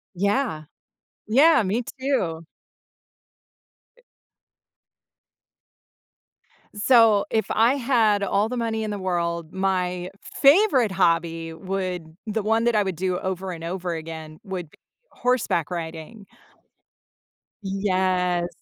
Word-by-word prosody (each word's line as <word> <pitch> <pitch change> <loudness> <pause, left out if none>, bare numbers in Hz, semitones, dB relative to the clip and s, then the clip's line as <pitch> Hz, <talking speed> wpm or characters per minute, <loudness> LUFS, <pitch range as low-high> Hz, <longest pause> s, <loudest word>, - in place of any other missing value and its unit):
Yeah. 200 - 0 0.6
Yeah, 275 +6 +5
me 210 +5 -1 0.2
too. 180 - -1 1.5
E - - -25 2.7
So, 220 -2 +5
if 220 - +1
I 235 +5 +3
had 230 -6 +2
all 200 +3 +1
the 250 - -3
money 225 -2 -1
in 215 - -3
the 205 - -4
world, 170 -3 -2
my 180 -2 -1
favorite 280 - +4
hobby 165 -3 0
would 180 -2 -4
the 215 0 -2
one 225 +2 +1
that 235 -2 +2
I 210 - +3
would 190 -2 -3
do 180 +2 -1
over 190 0 -4
and 165 -2 -8
over 180 0 -3
again 160 -1 -8
would 180 -5 -6
be - - -22 0.3
horseback 245 - 0
riding. 170 +5 -7 1.4
Yes. 185 -2 0
190 Hz, 110 wpm, -24 LUFS, 175-225 Hz, 2.7 s, Yeah